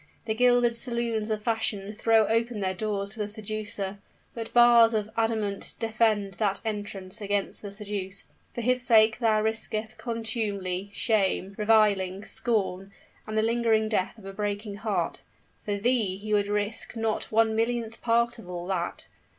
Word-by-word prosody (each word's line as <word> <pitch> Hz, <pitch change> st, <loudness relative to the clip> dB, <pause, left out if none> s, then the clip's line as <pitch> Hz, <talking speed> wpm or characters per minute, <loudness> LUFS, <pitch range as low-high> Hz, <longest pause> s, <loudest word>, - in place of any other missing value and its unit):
The 220 Hz, -, 0 dB
gilded 245 Hz, 0 st, +4 dB
saloons 235 Hz, -3 st, -1 dB
of 215 Hz, -1 st, -2 dB
fashion 220 Hz, -3 st, -1 dB
throw 225 Hz, 0 st, +3 dB
open 230 Hz, +1 st, 0 dB
their 190 Hz, -1 st, 0 dB
doors 200 Hz, 0 st, -2 dB
to 220 Hz, -, -9 dB
the 210 Hz, -, -1 dB
seducer; 210 Hz, -2 st, -4 dB, 0.3 s
but 225 Hz, -1 st, -5 dB
bars 235 Hz, -1 st, +6 dB
of 215 Hz, 0 st, -2 dB
adamant 220 Hz, -3 st, -1 dB
defend 215 Hz, -3 st, +1 dB
that 200 Hz, -2 st, +1 dB
entrance 205 Hz, -1 st, -4 dB
against 205 Hz, -1 st, -1 dB
the 205 Hz, -, -7 dB
seduced. 200 Hz, -2 st, -5 dB, 0.2 s
For 240 Hz, -, -2 dB
his 250 Hz, +2 st, +2 dB
sake 220 Hz, -3 st, +5 dB
thou 220 Hz, -3 st, +2 dB
risketh 220 Hz, 0 st, -2 dB
contumely, 210 Hz, -5 st, -2 dB
shame, 200 Hz, -3 st, +1 dB
reviling, 205 Hz, -3 st, +2 dB
scorn, 200 Hz, -4 st, -1 dB, 0.4 s
and 215 Hz, 0 st, -3 dB
the 215 Hz, -, +3 dB
lingering 225 Hz, -1 st, +2 dB
death 210 Hz, 0 st, -1 dB
of 210 Hz, -, -14 dB
a 195 Hz, -, -7 dB
breaking 205 Hz, 0 st, -3 dB
heart, 210 Hz, -1 st, -2 dB, 0.4 s
for 205 Hz, -, -1 dB
thee 210 Hz, -3 st, +1 dB
he 215 Hz, +2 st, -4 dB
would 205 Hz, -1 st, +2 dB
not 205 Hz, -, -2 dB
risk 210 Hz, +2 st, -2 dB, 0.4 s
one 220 Hz, 0 st, +3 dB
millionth 230 Hz, 0 st, -1 dB
part 235 Hz, 0 st, +1 dB
of 180 Hz, -, -12 dB
all 175 Hz, -1 st, -5 dB
that! 180 Hz, -2 st, -3 dB
215 Hz, 160 wpm, -27 LUFS, 200-225 Hz, 0.4 s, bars